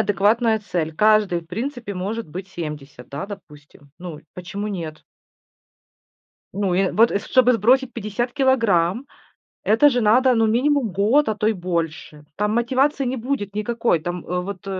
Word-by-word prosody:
адекватная 220 +2 +2
цель. 170 -6 -3
Каждый, 210 -2 +3
в 165 - -20
принципе, 230 - -5
может 200 +3 -4
быть 185 +5 -7
70, 150 -8 -8
да, 140 +4 -5
допустим. 150 -7 -13
Ну, 170 -4 -8
почему 195 +3 -5
нет? 165 -6 -6 1.5
Ну, 200 -3 0
и, 180 - +1
э, 190 - 0
вот, 230 +2 +4
и - - 0
чтобы 250 +4 +3
сбросить 250 +3 +2
50 230 +2 -3
килограмм, 230 - +2 0.6
это 225 +8 +5
же 250 -3 0
надо, 250 +4 +4
ну, 225 -1 +3
минимум 255 +2 +1
год, 220 +10 +3
а 220 - 0
то 210 +1 0
и 220 - +2
больше. 165 -4 -4
Там 210 +1 0
мотивации 260 +5 +1
не 255 +1 -2
будет 225 -5 -3
никакой. 225 -3 0
Там, 175 +2 -5
э, 180 0 -2
вот 195 +1 -7
210 Hz, 160 wpm, -22 LUFS, 180-235 Hz, 1.5 s, это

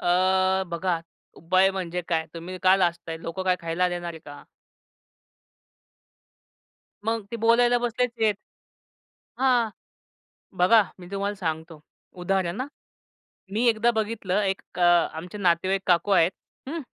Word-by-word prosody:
अ, 185 +1 +2
बघा 170 0 -1 0.4
उपाय 185 +3 +3
म्हणजे 180 -2 -4
काय? 160 -2 0
तुम्ही 175 +2 -7
का 185 +1 +6
लाजताय, 170 -3 -1
लोकं 165 +3 -5
काय 185 -1 +2
खायला 170 +2 0
देणार 175 -1 -4
आहे 160 - -10
का? 145 0 -10 2.6
मग 225 -1 -1
ते 235 - -3
बोलायला 240 +2 +4
बसलेचं 240 -1 -2
आहेत. 215 -1 +3 1.0
हां. 250 -4 +3 0.9
बघा 210 +4 +6 0.2
मी 175 - -11
तुम्हाला 200 +1 -2
सांगतो, 160 -3 -4 0.4
उदाहरण 190 +3 0
हां. 265 - -4 0.9
मी 230 +4 +1
एकदा 230 +1 +3
बघितलं 210 -3 -1
एक 195 -1 -1 0.2
अ, - - 0 0.4
आमचे 175 +5 -7
नातेवाईक 185 +1 +1
काकू 180 +3 +3
आहेत, 175 -2 +4 0.4
हं. 330 +2 -4
190 Hz, 125 wpm, -25 LUFS, 175-220 Hz, 2.6 s, का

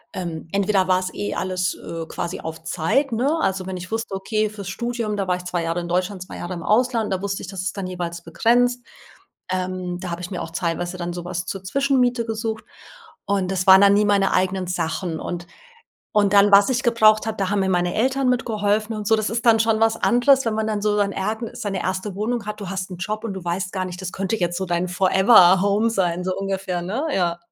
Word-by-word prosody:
ähm, 170 -3 -5
entweder 195 -1 +2
war 185 -1 +3
es 185 0 -4
eh 105 +1 -3
alles, 185 0 -1
äh, 165 -1 -7
quasi 170 +1 -4
auf 160 0 -7
Zeit, 180 - 0
ne? 270 +8 +1
Also, 190 -6 0
wenn 190 0 -5
ich 180 +2 -9
wusste 225 -2 -3
okay, 215 +2 -1
fürs 200 -2 -8
Studium 235 0 -3
da 195 -2 -2
war 180 - +2
ich 180 - -11
2 175 -1 -2
Jahre 165 +1 -1
in 170 - -6
Deutschland 185 +2 -1
2 - - -10
Jahre 175 +1 -5
im 170 - -6
Ausland. 230 0 +1
Da 190 - 0
wusste 200 -1 -2
ich, - - -7
dass 195 -2 -5
ist 190 +1 -3
dann 195 -2 -3
jeweils 175 -2 -5
begrenzt. 245 +8 +1 0.7
Ähm, 185 -1 -3
da 180 -1 -5
habe 170 +1 -4
ich 180 - -6
mir 180 - -3
auch 165 - -8
teilweise 175 +1 -2
dann 175 -1 -4
sowas 175 +1 -4
zur 195 -1 -5
Zwischenmiete 250 +1 +1
gesucht 220 -1 -3 0.6
und 195 -2 0
das 185 -1 -1
waren 190 0 +9
dann 200 0 +6
nie 210 +1 +3
meine 200 -1 +2
eigenen 185 0 0
Sachen 165 -1 -2
und 175 -1 -5 0.7
und 205 -2 +3
dann, 205 0 +6
was 200 +5 +7
ich 255 +1 0
gebraucht 220 -3 +4
habe, 220 -1 -3
da 195 -1 -1
haben 205 -1 +1
mir 190 - +1
meine 175 -1 +1
Eltern 260 +3 +1
mitgeholfen 215 -3 0
und 210 -1 -5
so. 220 - +4
Das 215 -1 -1
ist 230 +1 -2
dann 225 -1 +6
schon 225 -1 +2
was 225 0 +3
anderes, 255 +2 +3
wenn 225 - +1
man 220 0 -1
dann 215 -1 -1
so 210 0 +1
sein 200 -1 +1
ergn 220 +4 -3
seine 195 -3 -3
erste 185 +1 -3
Wohnung 220 +1 -2
hat. 210 0 -5
Du 195 -2 -6
hast 190 -1 -4
'n 180 - -6
Job 215 +3 -3
und 215 -4 -3
du 190 -2 -7
weißt 175 +1 -2
gar 185 -1 -2
nicht, 180 0 -7
das 180 - -5
könnte 195 +3 -2
jetzt 175 -3 -1
so 190 - -2
dein 175 +1 -1
Forever 190 +1 +5
Home 205 +3 +2
sein, 180 -4 0
so 185 0 -1
ungefähr, 190 -2 -3
ne? 220 - -2
Ja. 170 -2 0
195 Hz, 240 wpm, -22 LUFS, 180-220 Hz, 0.7 s, waren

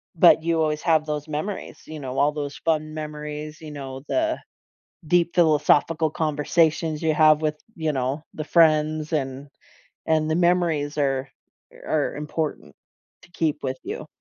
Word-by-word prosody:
But 160 -2 +6
you 165 -1 +1
always 155 -1 0
have 160 -2 +3
those 150 0 -3
memories, 155 +7 -5
you 155 -1 -7
know? 130 -1 -5
All 145 - +4
those 145 -1 -5
fun 155 -1 -1
memories, 150 0 -6
you 155 -1 -8
know, 135 -2 -7
the 320 0 0 0.7
deep 170 +1 +2
philosophical 160 -1 +3
conversations 155 +1 +1
you 160 -2 +2
have 155 0 +5
with 155 -1 0 0.2
you 160 -2 -1
know, 135 +3 -2
the 155 - -4
friends 155 -1 +3
and 135 -1 -2 0.6
and 155 -1 +2
the 160 - +2
memories 170 -4 +1
are 135 -2 0 0.6
are 150 -2 0
important 150 +1 -4 0.5
to - - -19
keep 155 -3 -1
with 130 -1 -3
you. - - -5
155 Hz, 150 wpm, -24 LUFS, 150-160 Hz, 0.7 s, But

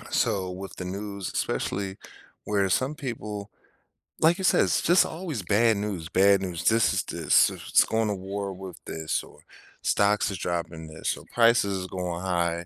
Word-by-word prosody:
On - - -13
a - - -13
so 95 -2 +1
with 95 +2 -8
the 90 - -5
news, 100 +1 -5
especially 95 -1 -2 0.5
where 100 -2 +1
some 130 +9 +1
people 105 -8 -6 0.7
like 165 +2 +5
you 190 - -5
said, - - +4
"It's - - +1
just 175 +2 +5
always 160 - -5
bad 110 +3 +3
news, 100 -6 -4
bad 100 +1 +4
news." 85 -2 -4
"This 115 0 +4
is - - 0
this; - - +3
s - - -9
it's - - +6
going 110 -1 0
to 105 - 0
war 100 +1 -4
with 95 -1 -9
this," 80 -1 -2
or - - -16 0.4
"Stocks 105 +1 +2
is 95 - -4
dropping 85 -2 -4
this," 80 0 -3
or - - -12
"Prices 115 -5 +4
is 90 - -5
going 90 -2 -4
high." 85 -2 -1
100 Hz, 190 wpm, -26 LUFS, 90-110 Hz, 0.7 s, it's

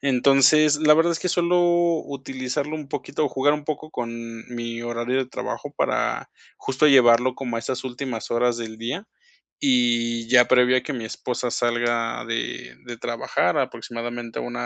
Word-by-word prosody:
Entonces, 140 +3 +4
la 150 0 +5
verdad 165 +2 +3
es 165 - -3
que 180 - -2
suelo 175 0 +2 0.5
utilizarlo 135 +2 -4
un 150 -3 -7
poquito 150 - -3
o - - +1
jugar 145 +3 +2
un 150 - -6
poco 155 +1 -5
con 120 -5 -4 0.4
mi 115 0 -5
horario 120 +2 -2
de 130 - -1
trabajo 130 - -6
para, - - -1 0.3
justo, 135 +3 +1
llevarlo 125 -2 +5
como 120 -4 -4
a - - -1
esas 130 +3 -4
últimas 125 -2 -5
horas 120 0 +1
del 110 -2 -6
día. 135 - -4 0.5
Y 120 -3 +1
ya 125 0 +6
previo 125 0 +4
a 130 - +1
que 150 - -5
mi 115 -3 -5
esposa 125 +2 -3
salga 120 -1 -1
de 60 - -4
de 120 -1 -7
trabajar, 115 0 -1
aproximadamente 120 0 -4
una - - -5
125 Hz, 170 wpm, -23 LUFS, 120-140 Hz, 0.5 s, ya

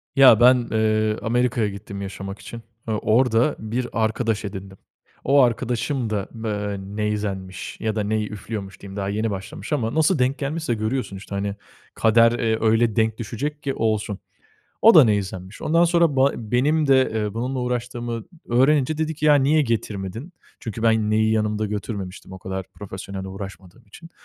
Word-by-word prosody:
Ya 130 -5 +8
ben, 125 +2 +7 0.2
ııı, 110 -1 +1
Amerika'ya 120 -1 +1
gittim 100 0 -8
yaşamak 95 0 -6
için. 115 0 -9 0.3
Iıı, 110 -1 0
orda 120 +5 +2
bir 120 +3 -3 0.2
arkadaş 110 -1 -1
edindim. 95 -1 -7 0.5
O 140 +1 +5
arkadaşım 120 0 0
da, 100 -3 -2
ııı, 105 -2 -3 0.2
neyzenmiş 100 -3 -3
ya 110 -1 -2
da 105 - 0
ney 110 +1 0
üflüyormuş, 105 -1 -7
diyeyim, 100 -1 -9
daha 100 0 -2
yeni 110 +2 -1
başlamış 100 +9 -6
ama 115 -4 -1
nasıl 160 +1 +3
denk 130 +3 +1
gelmişse... 150 -2 -2
Görüyorsun 110 0 -2
işte. 100 +1 -8
Hani 100 0 -2 0.4
kader, 115 +1 +4
ııı, 115 -2 0
öyle 115 0 +2
denk 110 -1 +1
düşecek 140 +6 -4
ki 135 -2 -1
olsun. 110 -2 -1 0.6
O 225 0 +8
da 155 - +9
neyzenmiş. 100 -2 -2
Ondan 165 +2 +3
sonra 170 -4 +3
ba 135 +1 +4
benim 135 +8 +1
de, 130 -1 +4
ııı, 105 -1 -2
bununla 130 +3 -2
uğraştığımı 120 -2 -3 0.2
öğrenince 140 +4 +3
dedi 160 0 -1
ki: 150 - -5
"Ya, 150 - +7
niye 145 +2 +4
getirmedin?" 110 - -3 0.3
Çünkü 115 0 -6
ben 110 -2 +2
neyi 110 0 +3
yanımda 105 0 0
götürmemiştim 100 -3 -6
o 95 - -8
kadar 95 0 -5
profesyonel 95 -1 -7
uğraşmadığım 95 +1 -9
için 165 - -14
110 Hz, 165 wpm, -23 LUFS, 105-125 Hz, 0.6 s, da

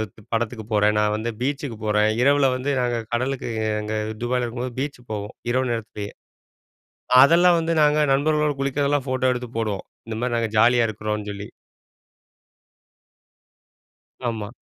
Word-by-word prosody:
து 110 - -16
படத்துக்கு 115 -1 -2
போறேன், 105 0 +3
நான் 105 0 +2
வந்து 110 +2 -2
பீச்சுக்கு 135 -3 -2
போறேன்." 105 0 +3
இரவில 140 +1 +4
வந்து, 130 +2 -3
நாங்க 120 -1 0 0.2
கடலுக்கு 130 +1 -1 0.3
அங்க 105 +1 -3 0.3
துபாயில 125 +1 0
இருக்கும்போது 120 +1 -5
பீச்சுக்கு 135 -3 -5
போவோம், 105 0 -5 0.2
இரவு 130 0 +1
நேரத்திலேயே. 105 -2 -5 1.1
அதெல்லாம் 170 +4 +6
வந்து 165 0 0
நாங்க 150 0 +4
நண்பர்களோட 150 +1 +2
குளிக்கிறதெல்லாம் 140 0 0
ஃபோட்டோ 130 0 +1
எடுத்து 125 -1 -5
போடுவோம், 105 -4 -2 0.2
இந்த 110 -1 -4
மாரி 125 -1 0
நாங்க 115 -1 0
ஜாலியா 120 +1 +5
இருக்கிறோம்ன்னு 105 -1 -4
சொல்லி. 100 0 -7 2.8
ஆமா. 110 -2 -5
120 Hz, 135 wpm, -23 LUFS, 110-135 Hz, 2.8 s, அதெல்லாம்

